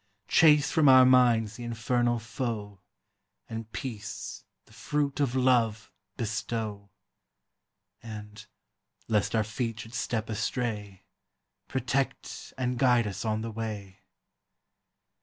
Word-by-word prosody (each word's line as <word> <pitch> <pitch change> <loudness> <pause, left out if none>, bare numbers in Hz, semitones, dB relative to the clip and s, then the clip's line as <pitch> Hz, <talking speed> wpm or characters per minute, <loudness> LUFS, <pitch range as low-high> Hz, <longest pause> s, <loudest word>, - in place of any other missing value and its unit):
Chase 150 -3 +5
from 155 -3 +5
our 130 -1 +9
minds 120 -4 +4
the 120 - -7
infernal 120 +1 0
foe, 110 -4 -4 0.7
And 110 -1 -6
peace, 110 -2 -6 0.2
the - - -21
fruit 145 -2 -1
of 135 -3 +1
love, 120 -4 +2 0.3
bestow; 110 -2 -3 1.1
And, 105 -2 -9 0.6
lest 105 0 +1
our 110 - +3
feet 115 +1 -3
should 115 +2 -11
step 115 -1 -2
astray, 105 -2 -3 0.6
Protect - - -2
and 125 -1 -1
guide 125 -3 +4
us 100 -2 -4
on 110 -1 -1
the 115 0 -4
way. 105 -4 -6
115 Hz, 110 wpm, -28 LUFS, 105-125 Hz, 1.1 s, our